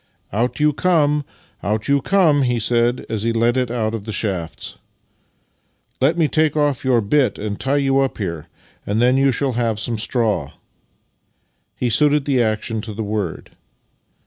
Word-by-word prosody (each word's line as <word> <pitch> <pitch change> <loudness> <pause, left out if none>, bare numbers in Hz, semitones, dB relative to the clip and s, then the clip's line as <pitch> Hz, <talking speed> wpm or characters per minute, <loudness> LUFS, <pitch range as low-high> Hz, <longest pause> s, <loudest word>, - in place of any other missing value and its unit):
" - - -29
Out 120 +7 -1
you 150 0 +3
come, 150 -3 +2 0.4
out 105 +1 -1
j^ou 140 +1 +1
come," 170 -8 +3
he 125 -2 +1
said 120 +2 +1
as 110 -2 -3
he 115 +2 0
led 115 +1 +2
it 125 -2 0
out 115 -2 -1
of 110 -3 -5
the 110 - -4
shafts. 95 -7 -3 0.6
" - - -44
Let 150 +6 +3
me 165 -3 +3
take 155 0 +1
off 145 -3 +1
your 125 -3 +3
bit 130 +6 +1
and 105 -1 -4
tie 135 +2 +1
you 135 -1 +2
up 135 -1 0
here, 85 -6 -4 0.4
and 105 +2 -1
then 125 +2 +4
you 135 0 +3
shall 135 +1 0
have 115 -2 -1
some 115 0 -2
straw." 110 - -1 1.2
He 125 -2 -1
suited 150 +2 +3
the 135 -4 +2
action 110 0 -1
to 105 -1 -6
the 110 - -3
word. 105 -5 -4
120 Hz, 180 wpm, -20 LUFS, 110-140 Hz, 1.2 s, then